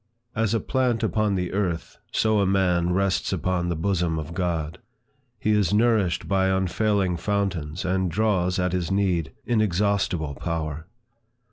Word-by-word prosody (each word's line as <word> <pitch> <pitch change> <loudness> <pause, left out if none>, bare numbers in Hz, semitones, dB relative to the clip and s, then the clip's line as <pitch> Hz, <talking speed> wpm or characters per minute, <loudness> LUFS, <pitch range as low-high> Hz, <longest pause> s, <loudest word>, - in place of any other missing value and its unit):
As 115 -1 +1
a - - +2
plant 125 -3 0
upon 105 -2 +1
the 90 -1 -2
earth, 90 -5 -2
so 110 -1 +2
a 100 - +3
man 90 -3 +2
rests 95 +1 +1
upon 90 -1 -1
the 85 - -1
bosom 85 -1 0
of 80 +1 -5
God; 85 -4 -2 0.6
he 110 - +1
is 105 -3 +2
nourished 105 -6 +2
by 95 -1 +2
unfailing 95 0 +1
fountains, 90 -4 -2
and 95 0 +1
draws, 95 -2 +1
at 90 -1 0
his 90 -3 -1
need, 90 -7 0
inexhaustible 100 -7 +1
power. 80 0 -4
95 Hz, 145 wpm, -25 LUFS, 85-100 Hz, 0.6 s, a